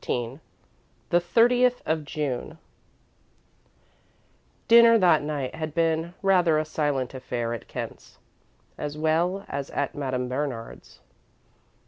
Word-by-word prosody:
XIV 120 +3 -3 0.7
THE 175 - +5
THIRTIETH 245 +7 +3
OF 160 -1 -1
JUNE 150 +1 -4 2.1
Dinner 230 0 +7
that 175 -6 +4
night 145 -3 -3
had 155 -2 -5
been 165 +1 0
rather 180 -5 +4
a 155 - 0
silent 145 -5 -2
affair 120 -3 -3
at 115 - -7
Kent's, - - -8 0.6
as 150 0 -4
well 170 +5 0
as 140 0 -5
at 140 - -2
Madame 130 -3 -3
Bernard's. 125 -3 -5
155 Hz, 110 wpm, -25 LUFS, 135-175 Hz, 2.1 s, Dinner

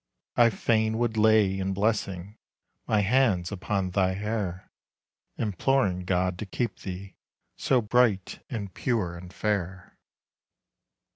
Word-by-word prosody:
I 120 -1 +6
fain 110 0 +1
would 120 -1 0
lay 105 -3 +4
in 95 0 -1
blessing 100 -1 -2 0.5
My 105 -1 +3
hands 105 -5 +2
upon 95 -1 -2
thy 95 0 +2
hair, 100 -3 -3 0.7
Imploring 100 -3 0
God 90 0 0
to 110 - -5
keep 115 +3 -3
thee, 95 +1 -7 0.4
So 130 -2 +2
bright, 110 -4 +1
and 100 -8 -5
pure, 105 -9 -1
and 90 +1 -10
fair. 95 -3 -3
100 Hz, 120 wpm, -27 LUFS, 95-110 Hz, 0.7 s, I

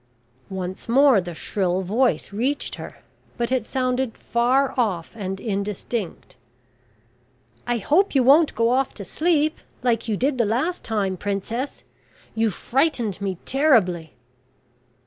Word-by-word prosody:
Once 190 +2 -5
more 265 -3 +5
the 175 -1 -7
shrill 185 +1 -1
voice 225 +3 0
reached 260 +7 -1
her; - - -10 0.3
but 240 0 -1
it 255 -4 0
sounded 255 -2 -1
far 255 +3 +1
off, 200 -10 -1
and 195 -3 -4
indistinct: 200 0 -4 1.3
"I 240 - +1
hope 310 - +2
you 265 - +5
won't 290 +5 +5
go 230 +1 +2
off 260 +1 +1
to 200 - -7
sleep, 310 - +1 0.2
like 230 -2 +1
you 215 -2 0
did 260 +2 0
the 235 - +4
last 265 - -1
time, 200 -4 -1
Princess; 205 +8 -3 0.5
you 225 0 +1
frightened 235 - 0
me 190 -2 -2
terribly." 205 - +2
230 Hz, 130 wpm, -23 LUFS, 195-265 Hz, 1.3 s, more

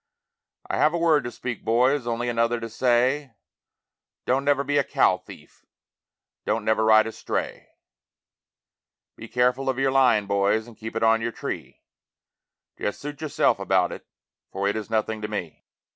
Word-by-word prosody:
I - - -2
have 155 +3 +3
a - - +1
word 165 -4 +3
to 120 - -4
speak, 120 -1 -6
boys, 125 +3 +2
only 120 +1 -2
another 115 0 +1
to 115 0 -6
say, 125 +2 +1 0.9
Don't 130 +2 +1
never 140 -1 +2
be 145 +1 +1
a - - +2
cow - - +2
thief, - - -15 0.8
don't 110 0 -1
never 110 0 +2
ride 110 0 +6
a 115 - -4
stray; - - -4 1.5
Be 115 - -10
careful 125 +3 +1
of 130 - -1
your 135 0 +1
line, 125 -6 +4
boys, 100 +2 +1
and 120 -2 -14
keep 110 +1 -8
it 115 - -1
on 115 0 +4
your 115 +1 -2
tree, - - -7 1.0
Just 105 - -3
suit 145 +1 -7
yourself 155 -3 +1
about - - +1
it, - - -9 0.4
for 100 +1 -2
it 100 - 0
is 110 -1 -5
nothing 110 0 -1
to 105 - -3
me. 95 -7 -6
120 Hz, 170 wpm, -24 LUFS, 110-135 Hz, 1.5 s, ride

